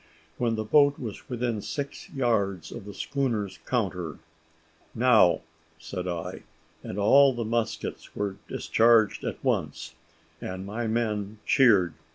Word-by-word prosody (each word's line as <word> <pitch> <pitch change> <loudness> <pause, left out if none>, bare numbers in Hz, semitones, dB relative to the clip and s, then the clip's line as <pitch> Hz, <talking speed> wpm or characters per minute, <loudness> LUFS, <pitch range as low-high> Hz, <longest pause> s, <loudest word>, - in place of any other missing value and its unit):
When 115 -2 +1
the 110 - -2
boat 145 +5 +4
was 115 +3 -7
within 120 -3 -2
six 140 +5 -5
yards 100 - 0
of 115 -4 -8
the 105 - -8
schooner's 120 -8 -2
counter. 90 - -2 0.8
"Now!" 110 -9 +5 0.4
said 90 +3 -6
I, 85 -2 -4 0.4
and - - -7
all 135 +7 +6
the 120 -2 -3
muskets 115 0 -3
were 100 -1 -2
discharged 115 -2 +3
at - - -5
once, - - -1 0.5
and 95 +1 -5
my 115 +3 -3
men 110 -2 -1
cheered. 100 -10 +4
110 Hz, 130 wpm, -27 LUFS, 100-120 Hz, 0.8 s, all